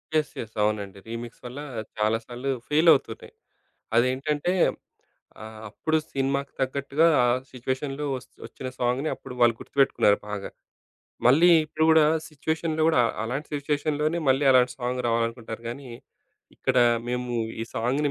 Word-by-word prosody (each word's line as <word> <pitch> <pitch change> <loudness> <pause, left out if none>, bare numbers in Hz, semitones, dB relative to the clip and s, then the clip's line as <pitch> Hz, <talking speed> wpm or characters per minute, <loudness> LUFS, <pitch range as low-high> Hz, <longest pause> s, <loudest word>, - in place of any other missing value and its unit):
Yes. 155 -2 +1
Yes. 110 -1 -7
అవునండి. 100 -2 -1
Remix 115 +1 -7
వల్ల 125 +4 -7 0.4
చాలా 110 +1 +2
సార్లు 125 +3 -4 0.2
ఫెయిలవుతున్నాయి. 155 -1 +3 0.6
అదేంటంటే 145 +7 +1 0.9
ఆహ్, 110 0 -9
అప్పుడు 160 +9 -1 0.2
సినిమాకు 140 +1 -1
తగ్గట్టుగా 140 +4 +1 0.2
ఆ - - +4 0.2
సిచ్యువేషన్‌లో 135 +3 -3
ఒస్త్ 130 +1 -13
ఒచ్చిన 130 - -7
సాంగుని 125 +5 0
అప్పుడు 125 - -10
వాళ్ళు 120 -1 +5
గుర్తుబెట్టుకున్నారు 135 -7 +2
బాగా. 105 -1 -5 0.8
మళ్ళీ 155 +8 +6 0.2
ఇప్పుడు 155 +1 -1
గూడా 160 -1 +6 0.2
సిచ్యువేషన్‌లో 160 +1 -2
గూడా, 160 -6 +4 0.2
అలాంటి 135 +6 -4
సిచ్యువేషన్‌లోనే 150 +3 -1
మళ్ళీ, 135 +2 +3
అలాంటి 130 -1 +4
సాంగ్ 125 0 -2
రావాలనుకుంటారు 115 0 -2
గానీ, 130 +3 -7 0.7
ఇక్కడ - - -1 0.3
మేము 125 0 -2 0.3
ఈ - - -3
సాంగ్‌ని 135 +6 0
130 Hz, 125 wpm, -26 LUFS, 120-150 Hz, 0.9 s, మళ్ళీ